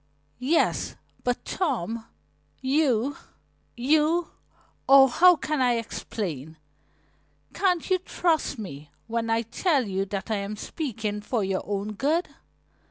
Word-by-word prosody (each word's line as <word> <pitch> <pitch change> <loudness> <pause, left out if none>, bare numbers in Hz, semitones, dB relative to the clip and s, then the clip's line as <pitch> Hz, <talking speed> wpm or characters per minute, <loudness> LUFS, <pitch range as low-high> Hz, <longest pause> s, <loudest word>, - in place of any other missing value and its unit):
"Yes, 280 +7 +1 0.3
but 245 -1 -1
Tom, 230 - -2 0.5
you 270 -2 +1 0.6
you 310 +6 +2 0.6
Oh, 270 0 +9
how 355 +8 +6
can 305 -2 -2
I 250 -1 +4
explain? 170 - -4 1.0
Can't 360 -2 +1
you 370 -1 +2
trust 335 -5 0
me 150 -9 -8 0.2
when 230 0 -2
I 225 +1 +2
tell 270 - +1
you 195 0 -1
that 195 +2 -4
I 215 - +1
am 200 +1 -4
speaking 215 -5 -4
for 220 +1 -1
your 190 0 -1
own 205 +1 -2
good? 305 - +1
240 Hz, 120 wpm, -26 LUFS, 210-305 Hz, 1.0 s, Oh